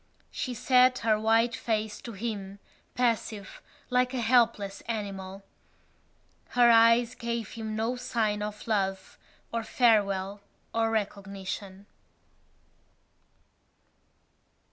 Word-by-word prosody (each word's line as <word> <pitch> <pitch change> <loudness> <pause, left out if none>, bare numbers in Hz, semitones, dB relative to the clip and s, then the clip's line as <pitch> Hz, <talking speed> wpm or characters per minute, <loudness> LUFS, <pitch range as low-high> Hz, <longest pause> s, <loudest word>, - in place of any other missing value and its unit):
She 250 -2 -4
set 255 +1 +4
her 215 -1 +3
white 225 +2 +3
face 220 -2 -2
to 235 - -8
him, 200 -2 -5 0.4
passive, 225 -4 -1 0.3
like 250 +1 +2
a - - -1
helpless 230 -4 +2
animal. 195 -3 -5 1.1
Her 240 -1 +7
eyes 230 +1 +5
gave 235 -3 -4
him 220 -1 -5
no 225 +3 -1
sign 225 -4 -1
of 210 0 -5
love 195 -3 -2 0.3
or 230 - 0
farewell 205 -4 +2 0.3
or 225 0 +1
recognition. 200 -2 -4
220 Hz, 100 wpm, -28 LUFS, 200-235 Hz, 1.1 s, Her